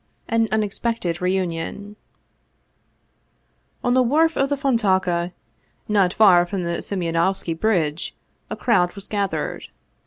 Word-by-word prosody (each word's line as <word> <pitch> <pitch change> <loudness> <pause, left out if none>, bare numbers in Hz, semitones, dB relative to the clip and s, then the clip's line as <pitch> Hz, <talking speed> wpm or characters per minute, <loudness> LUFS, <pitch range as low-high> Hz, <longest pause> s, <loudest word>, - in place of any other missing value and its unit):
AN 225 0 +2
UNEXPECTED 210 -4 -1
REUNION 185 +2 -2 1.9
ON 245 - +2
the 255 - +4
wharf 315 +6 +3
of 275 0 +1
the 285 - 0
Fontauka, 190 - +1 0.6
not 200 -4 +3
far 185 -5 +6
from 185 0 -3
Simeonov 170 +1 -1
ski 165 - -4
Bridge, 165 -4 -1 0.3
a - - -3
crowd 180 -7 +1
was 200 0 -9
gathered. 200 -2 -2
195 Hz, 115 wpm, -22 LUFS, 175-225 Hz, 1.9 s, far